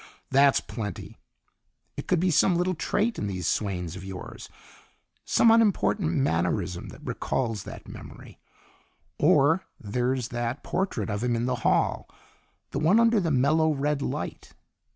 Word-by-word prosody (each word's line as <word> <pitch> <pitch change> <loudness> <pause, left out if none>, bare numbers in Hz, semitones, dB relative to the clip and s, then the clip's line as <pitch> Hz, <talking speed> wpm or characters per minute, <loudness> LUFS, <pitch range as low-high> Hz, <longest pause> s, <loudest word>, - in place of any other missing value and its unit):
"That's 140 +1 +5
plenty. 105 -4 -6 0.8
It - - -7
could 180 - +2
be 180 +1 +2
some 175 +3 +4
little 180 +2 +1
trait 210 +7 -1
in 105 - -2
these 95 -2 -4
swains 90 -5 -2
of 95 - -8
yours, 95 -1 -8 0.8
some 230 - +4
unimportant 210 -5 +3
mannerism 90 - 0
that - - -13
recalls 115 -6 -2
that - - -10
memory. - - -11 0.8
Or 160 +7 +4 0.2
there's 125 +3 -1
that 120 +2 -3
portrait 175 - -2
of 100 +3 -3
him 120 -1 +1
in 115 +1 -1
the 125 0 -1
hall - - +1 0.6
the - - -2
one 185 +9 +4
under 230 -1 +4
the 170 -4 0
mellow 155 +4 +3
red 145 +1 -1
light. - - -5
130 Hz, 145 wpm, -26 LUFS, 105-170 Hz, 0.8 s, That's